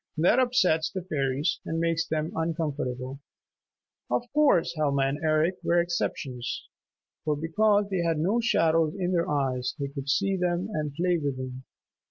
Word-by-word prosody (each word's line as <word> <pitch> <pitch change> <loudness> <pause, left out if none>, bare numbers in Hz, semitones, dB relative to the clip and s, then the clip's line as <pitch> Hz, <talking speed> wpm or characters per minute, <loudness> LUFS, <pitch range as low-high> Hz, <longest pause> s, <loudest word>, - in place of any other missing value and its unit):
That 180 +10 +4
upsets 190 -11 +3
the 185 -2 -5
fairies 140 -2 -1
and 165 - -3
makes 165 0 +1
them 155 0 -1
uncomfortable. 145 -5 -2 0.9
Of - - +1
course 285 - +4
Helma 140 -3 +1
and 135 +2 -1
Eric 160 +4 +2
were 175 - +3
exceptions, 135 -7 -2 0.6
for 150 -1 +1
because 205 +7 +2
they 185 -2 +1
had 165 -2 +1
no 190 +10 +1
shadows 165 -8 +2
in 180 -1 -1
their 170 -2 +1
eyes 130 -3 -1
they 140 -2 -3
could 140 -1 -6
see 195 +6 +2
them 180 +2 -1
and 150 -3 -2
play 175 +1 +1
with 140 -3 -2
them. 130 0 -6
160 Hz, 160 wpm, -27 LUFS, 140-180 Hz, 0.9 s, That